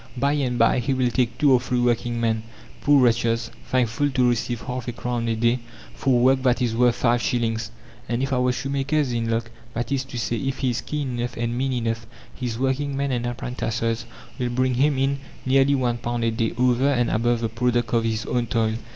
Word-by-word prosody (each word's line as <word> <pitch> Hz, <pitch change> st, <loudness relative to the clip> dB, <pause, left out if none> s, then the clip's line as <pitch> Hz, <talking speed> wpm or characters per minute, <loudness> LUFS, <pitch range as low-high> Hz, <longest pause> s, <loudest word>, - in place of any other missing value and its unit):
By 140 Hz, +3 st, +2 dB
and 130 Hz, -4 st, 0 dB
by 115 Hz, +2 st, +4 dB
he 130 Hz, +3 st, 0 dB
will 125 Hz, -2 st, +1 dB
take 120 Hz, -1 st, 0 dB
two 145 Hz, -2 st, +4 dB
or 125 Hz, -, +5 dB
three 125 Hz, 0 st, -1 dB
working 120 Hz, -1 st, +1 dB
men 110 Hz, -1 st, +1 dB, 0.4 s
poor 145 Hz, -2 st, +5 dB
wretches, 115 Hz, -1 st, +1 dB, 0.2 s
thankful 130 Hz, +3 st, +1 dB
to 130 Hz, -2 st, +2 dB
receive 120 Hz, 0 st, -1 dB
half 125 Hz, +1 st, -5 dB
a -, -, -1 dB
crown 120 Hz, 0 st, -3 dB
a 115 Hz, -, +1 dB
day 120 Hz, +2 st, +2 dB, 0.3 s
for 130 Hz, -2 st, +2 dB
work 130 Hz, +2 st, +4 dB
that 125 Hz, -2 st, +2 dB
is 120 Hz, -3 st, 0 dB
worth 120 Hz, 0 st, +4 dB
five 120 Hz, -1 st, +2 dB
shillings, 115 Hz, -2 st, -1 dB, 0.4 s
and 120 Hz, +2 st, 0 dB
if 135 Hz, -, -1 dB
our 125 Hz, 0 st, +2 dB
shoemaker 135 Hz, +3 st, -2 dB
is 145 Hz, -5 st, +1 dB
"in 115 Hz, -1 st, -1 dB
luck," 115 Hz, +1 st, -1 dB, 0.2 s
that 120 Hz, +2 st, -3 dB
is 135 Hz, -1 st, +1 dB
to 130 Hz, -2 st, -8 dB
say, 115 Hz, 0 st, -1 dB
if 135 Hz, +3 st, -2 dB
he 130 Hz, -2 st, 0 dB
is 120 Hz, +1 st, -2 dB
keen 135 Hz, -4 st, -3 dB
enough 120 Hz, 0 st, -3 dB
and 115 Hz, 0 st, -1 dB
mean 135 Hz, +2 st, 0 dB
enough, 115 Hz, -1 st, -2 dB, 0.3 s
his 120 Hz, -3 st, -4 dB
working 135 Hz, +2 st, -1 dB
men 140 Hz, 0 st, -1 dB
and 120 Hz, -1 st, -1 dB
apprentices 115 Hz, -1 st, -2 dB, 0.3 s
will 125 Hz, -1 st, 0 dB
bring 130 Hz, +1 st, +1 dB
him 140 Hz, +3 st, +2 dB
in 135 Hz, +1 st, +1 dB, 0.3 s
nearly 135 Hz, +1 st, +4 dB
one 120 Hz, -3 st, 0 dB
pound 120 Hz, 0 st, -2 dB
a 115 Hz, -, +2 dB
day, 115 Hz, 0 st, 0 dB
over 125 Hz, +2 st, +3 dB
and 120 Hz, -4 st, +1 dB
above 120 Hz, +1 st, +1 dB
the 115 Hz, -, +1 dB
product 120 Hz, 0 st, 0 dB
of 115 Hz, -1 st, +3 dB
his 115 Hz, -1 st, -1 dB
own 120 Hz, -1 st, -1 dB
toil. 110 Hz, 0 st, +1 dB
120 Hz, 220 wpm, -24 LUFS, 115-130 Hz, 0.4 s, or